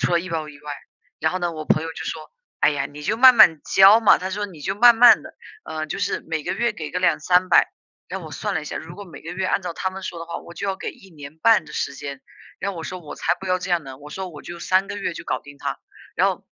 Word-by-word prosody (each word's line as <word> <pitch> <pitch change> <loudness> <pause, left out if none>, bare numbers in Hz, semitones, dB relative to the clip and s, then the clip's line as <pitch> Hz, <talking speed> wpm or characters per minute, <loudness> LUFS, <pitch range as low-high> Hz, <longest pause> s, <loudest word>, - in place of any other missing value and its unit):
除 - - 0
了 170 - +4
医 185 - -8
保 160 -2 -3
以 150 - -12
外， 150 -1 -6 0.5
然 160 +3 +1
后 185 - -1
呢， 175 -1 -2
我 155 -1 -6
朋 155 - +2
友 165 - -5
就 - - -7
说： - - -6 0.3
“哎 - - +5
呀， 145 -2 -2
你 150 +1 -11
就 210 +9 -1
慢 255 +1 +8
慢 170 -9 +7
交 195 +4 +7
嘛。 220 - +6
“他 185 - -4
说：” 205 +2 -3
你 170 -6 -13
就 190 +7 -2
慢 235 +2 +7
慢 245 +1 +7
地 - - -11 0.3
啊， 155 0 -5
就 155 - -5
是 200 0 -1
每 160 -2 -4
个 - - -2
月 235 -1 0
给 160 -7 -7
个 180 - -2
2、300。” 180 +1 +3 0.4
然 - - -5
后 - - -9
我 - - -10
算 - - -3
了 - - 0
一 - - -9
下， - - -6
如 - - -8
果 205 - -8
每 175 - -13
个 165 - -7
月 185 +1 -2
按 195 - 0
照 180 - -4
他 185 - -2
们 190 +1 -9
说 175 -2 -6
的 165 - -7
话， 170 - -5
我 - - -10
就 200 - -5
要 195 -1 -1
给 - - -5
1 190 - -18
年 150 -1 -12
半 225 -1 +4
的 150 - -13
时 140 - -3
间， 140 -1 -7 0.4
然 200 - -2
后 180 - -10
我 165 - -6
说： 185 - -6
“我 155 - -9
才 175 - 0
不 190 - -7
要 185 0 +1
这 180 0 -6
样 170 -2 +2
呢，” 135 -1 -9
我 150 +1 -12
说： 190 +3 -5
“我 150 -4 -11
就 175 - -8
3 185 +3 +1
个 205 - -5
月 195 -3 -3
就 - - -7
搞 - - -2
定 140 0 -14
它，” - - -4 0.4
然 - - +4
后 - - -4
175 Hz, 320 characters per minute, -22 LUFS, 155-195 Hz, 0.5 s, 慢